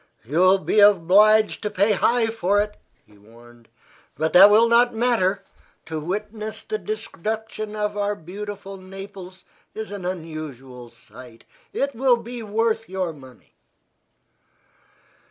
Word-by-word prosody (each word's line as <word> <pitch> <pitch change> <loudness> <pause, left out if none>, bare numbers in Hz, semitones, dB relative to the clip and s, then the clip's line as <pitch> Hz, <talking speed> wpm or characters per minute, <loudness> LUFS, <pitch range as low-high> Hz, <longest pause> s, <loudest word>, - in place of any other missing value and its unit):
"You 145 +8 -1
will 185 +1 +5
be 205 +2 0
obliged 205 +2 +5
to 210 - -2
pay 200 +2 +1
high 230 +3 +2
for 205 -3 0
it," 210 0 -2 0.3
he 105 -2 -23
warned; 120 +2 -19 0.5
"but 160 0 -2
that 195 +3 +9
will 220 +3 +5
not 235 0 +3
matter. 220 -5 +1 0.4
To 160 -1 -5
witness 210 +6 -5
the 430 0 -4
destruction 220 - -5
of 210 0 -2
our 205 0 -1
beautiful 195 +3 -8
Naples 190 0 -11 0.3
is 220 -1 -6
an 200 -2 -7
unusual 155 -8 -7
sight. 115 0 -15 0.3
It 280 0 -2
will 250 0 +3
be 235 +1 -8
worth 225 +1 -1
your 185 -3 -3
money." 130 -4 -17
200 Hz, 135 wpm, -22 LUFS, 165-220 Hz, 0.5 s, that